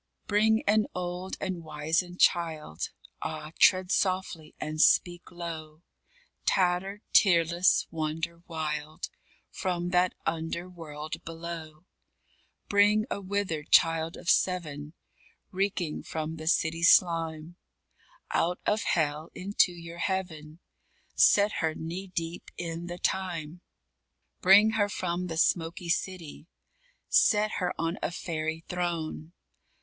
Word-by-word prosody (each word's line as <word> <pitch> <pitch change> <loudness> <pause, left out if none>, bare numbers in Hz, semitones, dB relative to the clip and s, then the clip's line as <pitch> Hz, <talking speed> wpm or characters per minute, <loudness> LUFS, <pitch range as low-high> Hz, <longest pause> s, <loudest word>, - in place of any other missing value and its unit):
_ - - -41
Bring 220 +2 +3
an 210 +1 +3
old 180 +1 -4
and 185 -3 -4
wizened 160 +4 -2
child 160 - +1 0.3
Ah, 155 -1 -5
tread 185 0 +5
softly 185 -5 -1
and 155 0 -2
speak 175 0 +3
low 165 -2 -7 0.6
Tattered, 190 +2 +1
tearless, 175 -1 +4
wonder 165 +1 -3
wild. 155 -2 -4 0.4
From 175 -2 -2
that 180 0 +2
under 165 +2 -2
world 155 -4 -8
below; 165 -1 -8 0.8
Bring 210 +1 +4
a 200 - -2
withered 185 -6 -2
child 165 0 +4
of - - -12
seven 155 -6 0 0.6
Reeking 185 -4 -1
from 160 0 -4
the 155 0 -8
City 165 -1 +1
slime, 165 -1 +3 0.7
Out 175 +2 +1
of 215 +1 +1
hell 155 -1 0
into 195 -1 +2
your 170 0 -10
heaven, 170 -4 -3 0.5
Set 205 +1 +5
her 160 -1 0
knee 175 +4 -5
deep 170 -2 -5
in 170 0 -5
the 175 0 -6
thyme. 175 -3 -2 0.8
_Bring 210 +4 +6
her 205 -1 +2
from 180 -2 -2
the 165 -2 -5
smoky 170 +1 +1
City, 170 -3 -3 0.6
Set 215 -1 +4
her 180 -2 0
on 165 +2 -2
a - - 0
fairy 160 -2 -4
throne. 170 -2 -3
170 Hz, 115 wpm, -28 LUFS, 160-185 Hz, 0.8 s, Bring